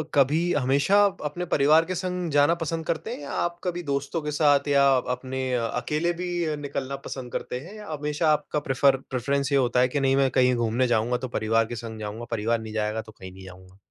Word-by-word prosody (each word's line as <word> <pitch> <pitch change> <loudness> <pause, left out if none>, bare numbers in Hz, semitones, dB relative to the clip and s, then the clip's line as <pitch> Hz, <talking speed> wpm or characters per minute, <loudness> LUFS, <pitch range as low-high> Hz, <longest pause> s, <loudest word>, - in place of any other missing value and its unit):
कभी 145 +4 +4
हमेशा 145 +9 +3 0.2
अपने 175 +5 -3
परिवार 155 +3 +5
के 185 +2 -3
संग 180 -1 -3
जाना 145 +4 +4
पसंद 165 0 -3
करते 155 - -3
हैं? - - -7
या 145 - -7
आप 175 0 -2
कभी 175 -1 -3
दोस्तों 140 +3 -2
के 150 0 -3
साथ 145 -1 +3
या 140 -1 +4 0.3
अपने 130 +1 -5
अकेले 150 +8 -1
भी 175 -3 -1
निकलना 140 -2 -4
पसंद 125 -2 -6
करते 125 - -4
हैं? 175 +9 -11
या 210 -1 -10
हमेशा 150 +1 -1
आपका 150 0 0
प्रेफर 135 -1 +2
प्रेफ़रेंस 140 +3 -1
ये 140 - +4
होता 125 -1 +2
है 125 - +4
कि 145 +3 -2
नहीं 135 0 +2
मैं 135 -1 +3
कहीं 125 -1 +3
घूमने 120 +2 +1
जाऊँगा 120 +1 +1
तो 130 +1 -5
परिवार 110 +1 +2
के 120 - -6
संग 110 -1 -7
जाऊँगा, 110 +2 -6
परिवार 115 +1 0
नहीं 110 -1 -8
जाएगा 110 0 -1
तो 110 0 -14
कहीं 95 -3 -11
नहीं 95 0 -12
जाऊँगा? 95 +1 -14
140 Hz, 215 wpm, -25 LUFS, 120-155 Hz, 0.3 s, परिवार